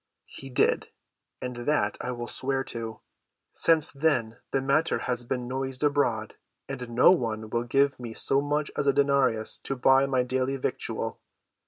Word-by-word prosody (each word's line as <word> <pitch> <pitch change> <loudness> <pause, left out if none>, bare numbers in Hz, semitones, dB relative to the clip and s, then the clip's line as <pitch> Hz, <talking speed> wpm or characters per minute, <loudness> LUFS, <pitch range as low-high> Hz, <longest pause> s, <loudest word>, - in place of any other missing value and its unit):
"He 135 - -10
did, 125 - +2 0.6
and 125 -1 -4
that 120 -4 0
I 125 - -3
will 120 -1 -5
swear 135 +2 -2
to. 115 -3 -6 0.5
Since 160 -2 +2
then 135 -6 0
the 135 - +1
matter 140 +5 +1
has 120 -1 -2
been 125 0 -3
noised 130 +1 -3
abroad, 125 -7 +1 0.3
and 125 -3 -6
no 120 +7 +6
one 110 -10 -1
will 120 0 -1
give 135 +2 +2
me 120 -2 -6
so 135 - +3
much 145 +1 -1
as 140 - -1
a 140 - +5
denarius 140 -6 +2
to 135 - -2
buy 135 +2 +4
my 130 -2 +1
daily 130 +2 -1
victual. - - -3
130 Hz, 165 wpm, -27 LUFS, 120-140 Hz, 0.6 s, no